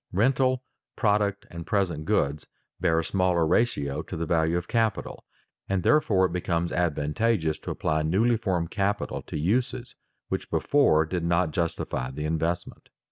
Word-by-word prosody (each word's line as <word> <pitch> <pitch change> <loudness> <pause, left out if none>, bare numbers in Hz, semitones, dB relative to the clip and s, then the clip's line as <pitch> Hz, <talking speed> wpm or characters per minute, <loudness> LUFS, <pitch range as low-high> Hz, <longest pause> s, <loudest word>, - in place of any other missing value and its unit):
Rental, 130 +5 +2 0.3
product, 105 -2 +1
and 85 0 -6
present 90 -8 0
goods, 70 0 0 0.3
bear 80 - +2
a - - -7
smaller 90 -2 +2
ratio 75 -8 +1
to 90 - -7
the 85 - -2
value 80 +1 +1
of 90 0 -4
capital, 115 -2 -1 0.4
and 95 -2 0
therefore 105 -11 +4
it 85 - -2
becomes 85 -1 -1
advantageous 80 +2 0
to - - -8
apply 80 0 0
newly 100 +10 +2
formed 90 -7 -1
capital 100 0 -1
to - - -6
uses 120 +9 -1 0.3
which - - -4
before 80 - +3
did 85 +2 -3
not 85 0 +1
justify 80 -6 -2
the 75 +3 -5
investment. 80 +2 -3
90 Hz, 150 wpm, -26 LUFS, 80-105 Hz, 0.4 s, therefore